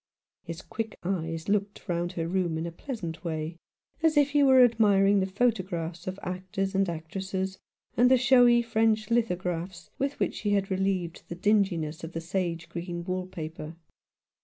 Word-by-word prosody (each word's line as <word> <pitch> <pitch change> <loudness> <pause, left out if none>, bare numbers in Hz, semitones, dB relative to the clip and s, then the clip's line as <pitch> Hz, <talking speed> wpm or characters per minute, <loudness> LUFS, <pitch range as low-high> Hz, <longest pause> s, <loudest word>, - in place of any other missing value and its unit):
His 170 +2 -7
quick 225 -1 -5
eyes 165 -3 -2
looked 205 0 -1
round 175 0 -1
her 165 -2 -2
room 175 -2 0
in 160 - -3
a 170 - -4
pleasant 170 - -6
way, 160 0 -3 0.4
as 315 -2 +3
if 290 -1 +4
he 290 0 +4
were 260 -2 +7
admiring 205 -4 +4
the 190 - 0
photo 225 +2 +2
graphs 175 -2 -5
of 185 +1 -4
actors 185 +2 -3
and 195 -1 +2
actresses, 190 +3 -4 0.4
and 245 +1 +5
the 260 - +6
showy 245 -1 +5
French 225 -1 +1
lithographs 180 -5 -1
with 275 +1 -1
which - - +1
she 205 -1 -1
had 195 -1 0
relieved 190 -3 -1
the 170 - -4
dinginess 175 -5 +1
of 165 +1 -6
the 165 - -2
sage 170 -1 -2
green 175 0 -5
wall 185 0 -3
paper. 160 -2 -7
190 Hz, 170 wpm, -28 LUFS, 170-215 Hz, 0.4 s, were